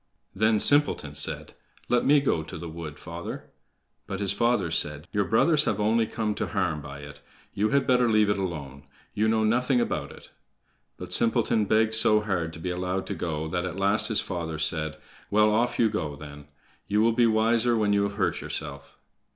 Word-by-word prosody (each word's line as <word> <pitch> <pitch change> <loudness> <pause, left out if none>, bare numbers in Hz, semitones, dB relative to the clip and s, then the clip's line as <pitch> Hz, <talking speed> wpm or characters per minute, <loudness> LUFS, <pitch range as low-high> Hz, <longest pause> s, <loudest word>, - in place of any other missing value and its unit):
Then 110 +2 +2
Simpleton 145 - +3
said: 75 - -4 0.3
"Let 120 -1 +2
me 145 +1 +4
go 130 - 0
to 80 - -9
cut - - -7
the 85 - -7
wood, 80 -2 -8
father." 85 +1 -8 0.6
But 100 -1 -4
his 100 -1 -1
father 105 -5 +1
said: 75 -2 -1
"Your 100 -1 0
brothers 150 - +3
have 105 - -1
only 110 +2 +2
come 110 -2 -2
to - - 0
harm 90 -7 -1
by 70 0 -9
it; 70 0 -11 0.3
you 105 +2 0
had 140 -1 +2
better 125 -2 +3
leave 110 -1 +3
it 100 - -1
alone. 70 -6 -6 0.3
You 110 +1 +1
know 110 0 +2
nothing 125 +4 +2
about - - -2
it." - - -15 0.7
But 90 -1 -5
Simpleton 115 0 +2
begged 110 +1 +2
so 110 -1 +4
hard 90 -6 -2
to 80 - -9
be 90 +2 -3
allowed 90 +1 -2
to - - -4
go 80 -2 -3
that 85 +1 -2
at 90 0 -5
last 100 +2 +1
his 110 - +1
father 85 -4 -4
said: 80 0 -1 0.3
"Well, 105 +1 +4
off 115 +3 +1
you 115 - +4
go 80 -9 -3
then. 75 0 -11 0.4
You 105 +1 +2
will 115 +1 +3
be 120 0 +3
wiser 115 +2 +2
when 105 -2 +2
you 100 - +3
have 100 0 -1
hurt 105 - -1
yourself." 70 -2 -6
100 Hz, 200 wpm, -26 LUFS, 80-110 Hz, 0.7 s, me